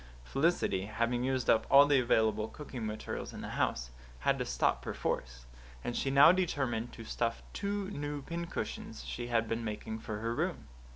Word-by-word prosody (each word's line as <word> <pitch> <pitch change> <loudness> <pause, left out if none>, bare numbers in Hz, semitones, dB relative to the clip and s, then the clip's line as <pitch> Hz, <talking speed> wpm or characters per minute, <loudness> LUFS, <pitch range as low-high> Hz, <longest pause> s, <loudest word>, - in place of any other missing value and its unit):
Felicity, 135 - +1
having 115 +3 0
used 130 -1 0
up 110 - +4
all 140 +1 +9
the 145 -2 +4
available 110 -3 +2
cooking 125 -3 -6
materials 105 0 -5
in - - -7
the - - -5
house, 60 0 -1 0.3
had - - +2
to - - -1
stop - - +1
perforce; - - -3 0.4
and 120 - -3
she 135 - 0
now 140 +4 +8
determined 135 -10 0
to 115 - -9
stuff 115 0 -1
two 200 -1 -2
new 145 -3 -4
pincushions 170 - -5
she 65 - -4
had 115 -1 +1
been 115 +1 -2
making 110 0 -4
for 110 -1 -5
her 115 +2 -2
room. - - -2
120 Hz, 175 wpm, -32 LUFS, 110-145 Hz, 0.4 s, all